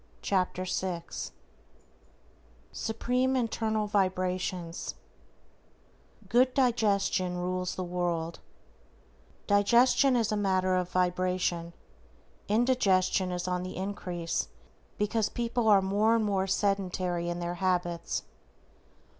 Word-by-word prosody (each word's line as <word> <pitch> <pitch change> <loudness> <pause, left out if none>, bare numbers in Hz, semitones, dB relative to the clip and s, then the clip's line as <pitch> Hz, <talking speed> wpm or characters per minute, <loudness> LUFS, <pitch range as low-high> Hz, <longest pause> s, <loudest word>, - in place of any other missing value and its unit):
=Lesson 185 -1 +1
Sixth 180 -2 -3 1.4
SUPREME 250 +4 0
INTERNAL 220 -3 0
VIBRATIONS 185 -3 -1 1.3
GOOD 255 +2 +4
DIGESTION 200 -7 +1
RULES 180 0 -2
THE 185 - -3
WORLD=: 175 -2 -2 1.1
Digestion 240 +6 +4
is 230 -3 +1
a - - +1
matter 190 -2 +1
of 180 -1 0
vibration. 180 -1 0 0.7
Indigestion 200 -5 +2
is 180 0 -3
on 180 0 -1
the 185 0 -6
increase 180 -3 -3 0.5
because 210 +1 0
people 235 -1 -1
are 200 -3 +6
more 210 +4 +3
and 225 -2 +1
more 195 -2 0
sedentary 185 -3 0
in 175 - -2
their 175 0 -3
habits. 175 -2 -1
185 Hz, 95 wpm, -29 LUFS, 180-215 Hz, 1.4 s, are